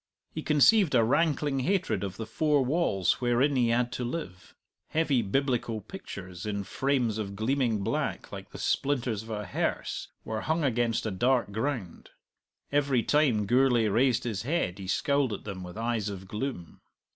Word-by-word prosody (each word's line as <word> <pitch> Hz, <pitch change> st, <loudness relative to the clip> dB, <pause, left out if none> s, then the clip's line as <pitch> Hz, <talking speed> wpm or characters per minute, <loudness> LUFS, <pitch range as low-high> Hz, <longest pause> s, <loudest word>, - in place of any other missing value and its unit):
He 155 Hz, -, -4 dB
conceived 155 Hz, +3 st, +4 dB
a 115 Hz, -, +5 dB
rankling 145 Hz, +1 st, +1 dB
hatred 185 Hz, -, 0 dB
of 95 Hz, -1 st, -5 dB
the 110 Hz, -, -4 dB
four 145 Hz, +2 st, +1 dB
walls 130 Hz, -, +1 dB
wherein 125 Hz, +4 st, +2 dB
he 120 Hz, -2 st, +3 dB
had 120 Hz, +1 st, +1 dB
to 125 Hz, -, -3 dB
live. 110 Hz, -, -6 dB, 0.3 s
Heavy 150 Hz, -6 st, +1 dB
Biblical 120 Hz, 0 st, 0 dB
pictures, 95 Hz, -, -9 dB
in 100 Hz, -1 st, -2 dB
frames 125 Hz, -2 st, 0 dB
of 100 Hz, -2 st, -4 dB
gleaming 115 Hz, -1 st, 0 dB
black -, -, -2 dB
like -, -, -8 dB
the -, -, -10 dB
splinters 125 Hz, -6 st, 0 dB
of 110 Hz, -, -12 dB
a 105 Hz, -1 st, -3 dB
hearse, 90 Hz, -, -2 dB, 0.2 s
were 110 Hz, -1 st, -3 dB
hung 160 Hz, +1 st, 0 dB
against 120 Hz, -4 st, +1 dB
a 110 Hz, -, -1 dB
dark 120 Hz, +3 st, +1 dB
ground. 110 Hz, -4 st, -3 dB, 0.6 s
Every 140 Hz, -4 st, +2 dB
time 130 Hz, -9 st, +2 dB
Gourlay 120 Hz, -1 st, +3 dB
raised 120 Hz, +3 st, +2 dB
his 110 Hz, -6 st, -2 dB
head 125 Hz, -, -1 dB
he 95 Hz, -, -7 dB
scowled 140 Hz, +3 st, +1 dB
at -, -, -6 dB
them 100 Hz, -3 st, -6 dB
with 90 Hz, +2 st, -8 dB
eyes 115 Hz, -2 st, -1 dB
of 95 Hz, -1 st, -7 dB
gloom. 105 Hz, -, -5 dB
120 Hz, 170 wpm, -28 LUFS, 105-140 Hz, 0.6 s, a